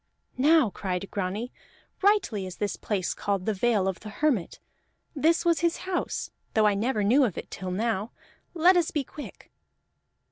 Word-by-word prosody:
"Now," 295 -4 +5
cried 185 0 -3
Grani, 205 +6 -3 0.5
"rightly 385 - +2
is 185 - -8
this 205 -1 -2
place 195 -4 -2
called 200 -2 -2
the 220 - +1
Vale 205 -1 +1
of 190 -2 -2
the 215 - -9
Hermit; 230 - 0 0.6
this 325 +5 +2
was 335 -1 +3
his 340 0 +1
house, 375 -1 -2 0.2
though 220 -1 +4
I 210 - +4
never 215 +2 0
knew 250 +8 +5
of 220 -9 0
it - - -7
till 185 -1 -5
now. 215 +2 -1 0.4
Let 350 +3 +5
us 345 -2 +2
be 295 - -1
quick!" 290 +3 -11
220 Hz, 170 wpm, -27 LUFS, 195-305 Hz, 0.6 s, Now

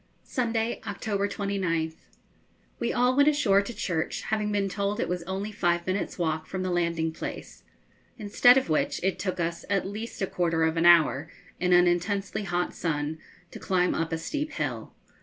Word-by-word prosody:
Sunday, 230 -2 -1
October 200 0 -1
29th. 180 -6 -2 0.7
We 235 - 0
all 250 +1 +2
went 285 +2 +6
ashore 225 -10 +3
to 205 - -6
church, 170 -8 -2
having 215 -1 -1
been 200 -1 +1
told 200 +1 -2
it - - 0
was 180 0 -2
only 195 +3 -3
five 175 -4 0
minutes' 185 +2 -2
walk 160 -2 -1
from 190 -1 -4
the 185 - -1
landing 170 -2 0
place, - - -7 0.6
instead 235 +3 +5
of 265 - +1
which 155 - 0
it 190 0 0
took 185 -2 -3
us 170 0 -2
at 195 -2 +1
least 215 +4 -6
a 195 - +1
quarter 165 -3 0
of 160 0 +2
an 165 +1 +3
hour, 160 -3 +5 0.3
in 180 0 +1
an 175 0 +6
intensely 195 +4 0
hot 175 -1 -1
sun, 155 -1 -2 0.3
to - - -9
climb 180 -1 +1
up 165 0 -2
a 165 - 0
steep 300 - -4
hill. - - -3
185 Hz, 180 wpm, -27 LUFS, 170-205 Hz, 0.7 s, went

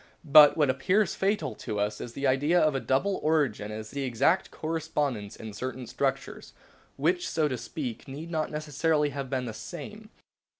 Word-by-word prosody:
But 150 0 +8
what 145 -4 +4
appears 185 +11 +1
fatal 195 - 0
to 105 - -4
us 105 +1 -1
to - - -5
the 135 +4 -5
idea 145 +6 +3
of 155 -3 +3
a 135 - 0
double 175 +11 0
origin 140 -10 +1
is 110 0 -7
the 140 - -4
exact 135 +8 +1
correspondence 150 -9 -3
in 110 -1 -8
certain 130 +3 -5
structures, - - -3 0.4
which, 175 +5 +1
so 155 -2 +1
to 130 - -2
speak, 130 -7 -6
need 150 +5 -7
not 155 -2 -1
necessarily 150 0 0
have 140 -2 -5
been 130 -1 -1
the 115 - -5
same. 210 - -9
145 Hz, 175 wpm, -28 LUFS, 130-160 Hz, 0.4 s, But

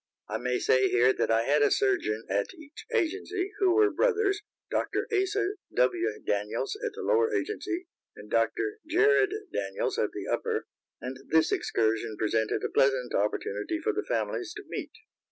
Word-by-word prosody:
I - - -3
may 125 0 0
say 130 0 +3
here 125 +2 +4
that - - -1
I 115 0 +3
had 145 +4 +3
a 145 - +5
surgeon 110 -4 +1
at 100 +1 -1
each 310 0 -12
agency, 390 -1 -1
who 375 -3 +4
were 420 -1 +5
brothers, 420 -4 +2 0.3
Dr. - - 0
Asa 395 0 +1 0.3
W. 120 -3 +1
Daniels 105 - -1
at 470 -3 -2
the 455 - -6
lower 455 -2 +3
agency 400 -3 -2 0.3
and - - -11
Dr. 415 +1 0
Jared 410 +5 +4 0.2
Daniels 95 0 -2
at - - +1
the - - -6
upper, - - -1 0.3
and 130 +1 -6
this 160 0 +4
excursion 110 0 0
presented 110 0 0
a - - -1
pleasant 135 -2 +2
opportunity 105 - -1
for 430 +5 0
the 415 - -1
families 360 -2 -2
to 420 - -7
meet. - - -5
315 Hz, 165 wpm, -28 LUFS, -, 0.3 s, a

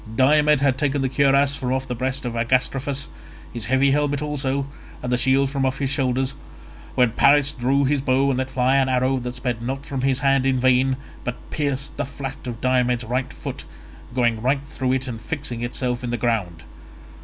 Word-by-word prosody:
Diomed 150 +3 +4
had 135 -2 +2
taken 145 -2 0
the 130 - +1
cuirass 140 +1 +3
from 125 -3 -3
off 130 0 -1
the 125 - -2
breast 130 +2 -2
of 120 - -3
Agastrophus, 130 +4 0 0.5
his 115 -4 -5
heavy 130 +5 +3
helmet 145 0 +1
also, 140 -2 -1 0.4
and 125 - -2
the - - +3
shield 135 +2 +2
from 140 -1 -1
off 130 0 0
his 135 -1 -1
shoulders, 130 -1 0 0.6
when 125 -2 +4
Paris 140 +4 +4
drew 135 +1 +1
his 140 0 +1
bow 135 +1 +2
and 130 - -1
let 130 0 -2
fly 130 0 +2
an 135 -1 +2
arrow 130 +1 +1
that 125 0 -5
sped 120 -3 -3
not 135 +4 -4
from 135 -2 -3
his 135 -1 +2
hand 135 -1 +2
in 130 -1 +1
vain, 130 +1 +3 0.3
but 125 - -3 0.2
pierced 140 -2 -2
the - - -1
flat 135 -1 -7
of 120 -2 -5
Diomed's 125 -1 +1
right 125 +3 -2
foot, - - -7 0.5
going 120 -3 +1
right 135 +3 +1
through 130 -3 -1
it 130 0 -1
and 115 -3 -6
fixing 125 -4 -4
itself 120 0 -2
in 120 - -3
the 120 - -1
ground. 100 -9 -1
130 Hz, 200 wpm, -22 LUFS, 125-140 Hz, 0.6 s, Diomed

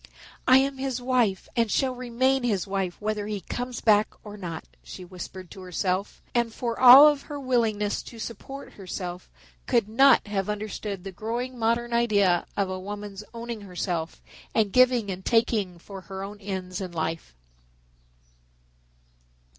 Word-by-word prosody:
"I 255 - +8
am 270 0 +1
his 265 -2 -2
wife 245 -6 +1
and 230 -2 +2
shall 265 -2 +1
remain 255 +2 +1
his 215 -7 0
wife 195 -3 -3
whether 210 -1 -2
he 210 -2 -3
comes 245 +6 -5
back 210 -1 +5 0.2
or 210 -1 -9
not," 175 -5 -6 0.2
she - - -10
whispered 185 0 -9
to 190 - -10
herself, 185 +2 -2
and 235 -1 +1
for 235 0 -3
all 260 +4 +11
of 295 -2 +2
her 290 -1 -5
willingness 225 -6 0
to 235 - -10
support 270 +5 -8
herself 180 -2 -6 0.4
could 235 -5 +2
not 270 +6 +5
have 205 -1 -2
understood 210 -2 -4
the 195 - -6
growing 235 +6 -4
modern 235 +1 0
idea 205 -7 +3
of 200 -1 +1
a 185 0 -4
woman's 205 +1 -7
owning 235 -1 -6
herself 175 -4 -4 0.3
and 215 -3 +2
giving 250 -5 +4
and 190 0 -6
taking 215 -6 +1
for 195 +3 -10
her 190 +2 -7
own 205 +1 -8
ends 190 -2 -5
in 185 -2 -5
life. 160 - -3
210 Hz, 155 wpm, -26 LUFS, 190-240 Hz, 0.4 s, all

